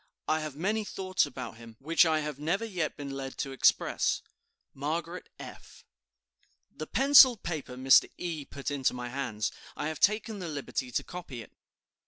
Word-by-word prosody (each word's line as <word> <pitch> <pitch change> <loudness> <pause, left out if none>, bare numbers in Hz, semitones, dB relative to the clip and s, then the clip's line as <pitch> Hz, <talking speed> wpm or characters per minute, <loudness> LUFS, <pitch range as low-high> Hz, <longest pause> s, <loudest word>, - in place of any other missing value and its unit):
I 155 0 +2
have 155 -3 -5
many 210 +8 -1
thoughts 190 -2 0
about 125 -3 -8
him, 115 -1 -13
which 165 +6 +3
I 155 -1 +2
have 150 -2 -5
never 175 +9 -1
yet 180 -8 -3
been 140 -1 -6
led 135 -1 -6
to 135 - -3
express. 135 - +2 0.5
"MARGARET 165 +5 -4
F. - - -12 0.9
"The - - -6
penciled 265 -4 +7
paper 150 -7 -4
Mr. 130 +1 +6
E. 165 -4 -4
put 140 +1 -5
into 135 -3 0
my 125 0 -5
hands. 120 -5 -2 0.2
I 155 - -2
have 155 - -6
taken 215 0 +1
the 180 - -5
liberty 140 -3 -4
to 120 - -1
copy 145 -10 -8
it. - - -18
155 Hz, 170 wpm, -29 LUFS, 135-180 Hz, 0.9 s, penciled